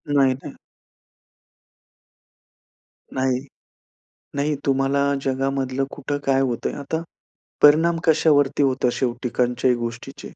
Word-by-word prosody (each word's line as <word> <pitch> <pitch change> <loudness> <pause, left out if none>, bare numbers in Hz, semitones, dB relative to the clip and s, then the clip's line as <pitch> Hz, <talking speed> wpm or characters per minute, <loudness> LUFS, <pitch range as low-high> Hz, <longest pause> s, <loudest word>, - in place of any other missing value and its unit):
नाही, 135 -2 +4
नाही. - - -8 2.6
नाही. 130 -1 +1 1.0
नाही. 145 +1 0
तुम्हाला 135 +1 +2 0.2
जगामधलं 135 0 -1
कुठं 145 0 -3
काय 135 0 +3
होतं 125 -3 -1
आहे. - - -7
आता 160 +3 -3 0.6
परिणाम 165 +3 +5
कशावरती 145 -3 +3
होतं 130 -2 +2
शेवटी 125 -1 -2
कोणत्याही 125 +1 +1
गोष्टीचे? 120 +3 -6
135 Hz, 100 wpm, -22 LUFS, 130-145 Hz, 2.6 s, परिणाम